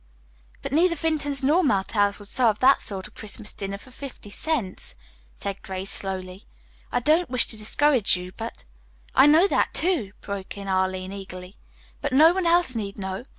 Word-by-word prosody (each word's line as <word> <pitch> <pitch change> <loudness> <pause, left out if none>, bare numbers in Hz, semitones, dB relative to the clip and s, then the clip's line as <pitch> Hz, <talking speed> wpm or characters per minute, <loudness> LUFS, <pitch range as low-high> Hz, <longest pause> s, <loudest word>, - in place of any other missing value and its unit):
"But - - -5
neither 335 +4 +3
Vinton's 290 -3 0
nor 315 +7 +3
Martell's 205 -4 +1
would 205 - -10
serve 225 -2 +2
that 265 +3 +4
sort 190 -2 -4
of 215 - -20
Christmas 215 0 -1
dinner 195 0 -5
for 255 +6 -16
fifty 250 -6 -10
cents," 250 -9 -3 0.4
said 200 -1 -4
Grace 190 +1 -3
slowly. 190 0 -3 0.5
"I - - +1
don't 315 +7 +2
wish 250 -1 +3
to - - -2
discourage 225 0 +3
you, 180 0 -8
but 225 +1 -7 0.3
" - - -32
"I - - +6
know 315 +5 +6
that, - - +1
too," 315 - 0
broke 200 0 -7
in 200 0 -7
Arline 185 0 -1
eagerly, 185 -1 -9 0.5
"but 285 -2 -2
no 315 +5 +7
one 370 -2 0
else 340 -5 +3
need 200 -3 -4
know. 190 +3 -5
215 Hz, 180 wpm, -24 LUFS, 195-290 Hz, 0.5 s, no